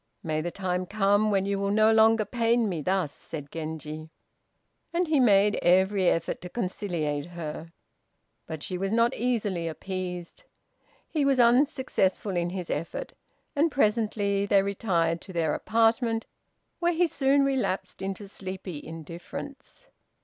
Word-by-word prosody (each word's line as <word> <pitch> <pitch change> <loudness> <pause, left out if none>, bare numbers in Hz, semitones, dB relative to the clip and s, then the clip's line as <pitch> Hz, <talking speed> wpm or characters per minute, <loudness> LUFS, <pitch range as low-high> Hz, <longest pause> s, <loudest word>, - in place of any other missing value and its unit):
May 155 -1 -1
the 175 - -2
time 180 0 -2
come 205 +1 +2
when 195 -2 +2
you 200 0 -1
will 200 0 0
no 215 +2 +4
longer 220 0 +5
pain 230 +1 +1
me 175 -6 -2
thus," 185 -2 0
said 145 -3 -8
Genji; 155 -1 -6 0.8
and 345 +1 0
he 310 -2 +3
made 205 -4 +4
every 190 +1 +4
effort 165 - -1
to 180 - -7
conciliate 175 -8 -2
her. 165 -1 -7 0.8
But 160 -2 -6
she 180 -1 -4
was 195 +1 -1
not 230 +2 +3
easily 210 -8 -1
appeased. 180 - -5 0.7
He 305 -3 0
was 275 -2 +3
unsuccessful 240 -6 +2
in 175 0 0
his 180 -1 -5
effort, 170 - -4 0.4
and 305 +3 +3
presently 210 -4 +1
they 200 -1 +4
retired 175 -5 0
to 190 - -10
their 160 -3 +1
apartment, 225 0 +1 0.5
where 345 0 +2
he 350 +2 +3
soon 275 -3 +2
relapsed 265 -8 -1
into 195 +1 -4
sleepy 185 -5 -7
indifference. 260 - -9
195 Hz, 140 wpm, -27 LUFS, 175-230 Hz, 0.8 s, longer